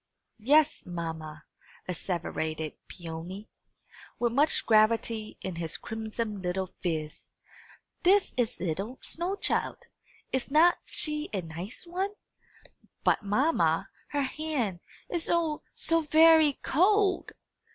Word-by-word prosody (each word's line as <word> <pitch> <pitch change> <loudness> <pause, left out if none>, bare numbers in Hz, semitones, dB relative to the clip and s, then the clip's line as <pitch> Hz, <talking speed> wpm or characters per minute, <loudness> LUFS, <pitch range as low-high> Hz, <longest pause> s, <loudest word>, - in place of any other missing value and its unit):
"Yes, 295 +7 +4
mamma," 160 -3 -6 0.4
asseverated 160 -3 -3
Peony, 175 +4 -8 0.7
with 240 -1 +1
much 290 +6 +2
gravity 220 0 +2
in 185 -3 -4
his 165 -1 -2
crimson 220 -2 -4
little 185 +1 -2
phiz, 155 -4 -3 0.7
"this 390 +2 +4
is 245 -3 -1
'ittle 195 +8 -3
snow 350 +4 -1
child. - - -1 0.5
Is 260 0 -1
not 320 +5 +5
she 300 0 -2
a 195 - 0
nice 170 - -6
one? 375 +4 -2 0.9
But, - - +3
mamma, 255 +11 +2 0.2
her 285 -1 -1
hand, 265 - -2 0.3
is 340 -2 -2
oh, 330 -3 +1
so 330 0 +2
very 315 0 +6
cold!" 390 +5 +3
230 Hz, 110 wpm, -29 LUFS, -, 0.9 s, very